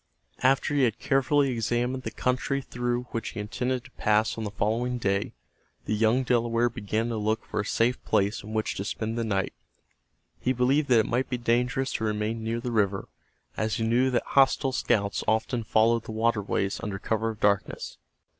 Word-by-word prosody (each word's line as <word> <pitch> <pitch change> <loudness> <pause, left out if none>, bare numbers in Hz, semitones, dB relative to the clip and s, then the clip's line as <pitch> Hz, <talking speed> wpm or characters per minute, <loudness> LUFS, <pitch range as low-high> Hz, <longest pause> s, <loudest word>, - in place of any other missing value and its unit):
After 135 +2 +3
he 145 - +2
had 120 -3 +2
carefully 135 +1 +2
examined 120 +2 -1
the - - -4
country 130 +2 -1
through 120 -2 -2
which 115 - -3
he 115 - -7
intended 125 +4 -2
to - - -15
pass 105 +1 +1
on 115 - -4
the - - -2
following 115 +4 -1
day, 100 -3 -1 0.5
the 110 - -1
young 115 +4 +3
Delaware 120 -1 +1
began 110 +1 -2
to 115 - -2
look 110 +1 -1
for - - -3
a 100 - -1
safe 120 +3 +1
place 100 +2 +1
in 105 - -9
which 110 0 -1
to 95 - -2
spend 110 +2 -3
the 115 - -1
night. 100 -4 -1 0.9
He 130 - +1
believed 130 +4 +2
that 120 -3 +6
it - - -3
might 125 +3 -1
be 125 - -1
dangerous 125 +3 0
to - - -2
remain 110 +1 -1
near 115 +1 -1
the 120 0 -4
river, 100 -3 0 0.5
as 110 -1 -1
he 115 - -1
knew 120 +4 +3
that 125 - +1
hostile 135 0 +4
scouts 105 -5 0
often 110 +2 +1
followed 115 +1 +2
the 110 - -6
waterways 110 -3 0
under 100 -3 -3
cover 110 +3 -1
of 110 -1 -6
darkness. 100 -1 0
115 Hz, 190 wpm, -27 LUFS, 110-125 Hz, 0.9 s, that